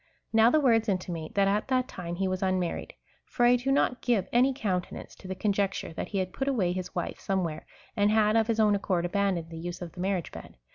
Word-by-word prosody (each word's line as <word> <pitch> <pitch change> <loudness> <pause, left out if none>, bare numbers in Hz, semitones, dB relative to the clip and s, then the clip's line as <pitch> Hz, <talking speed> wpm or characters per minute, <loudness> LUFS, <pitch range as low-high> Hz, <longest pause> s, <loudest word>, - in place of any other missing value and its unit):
^ - - -38 0.3
Now 225 +1 +6
the 310 - +4
words 230 -5 +3
intimate, 175 -4 -3
that 200 -1 +3
at 205 +2 0
that 255 -1 +1
time 175 -6 -6
he 190 +2 -1
was 185 0 -2
unmar 185 -2 0
lied; - - -10 0.3
for 240 - 0
I 245 +1 +6
do 250 +2 -1
not 255 -2 +1
give 235 -7 +1
any 250 +3 +4
countenance 195 -9 -3
to 190 - -11
the 190 - -4
conjecture, 195 -3 -1
that - - -4
he 200 - -4
had 185 -1 -2
put 270 - -3
away 215 -11 +1
his 180 0 -5
wife - - -3
somewhere, 175 -5 -2 0.3
and 205 -1 +3
had 215 0 +3
of 225 -1 +3
his 225 -1 0
own 210 -1 +5
accord 185 -3 0
abandoned 180 -3 -1
the 165 - -7
use 175 +1 -5
of 175 -2 -7
the - - -13
marriage 185 -2 -1
bed. - - -11
195 Hz, 245 wpm, -28 LUFS, 180-225 Hz, 0.3 s, Now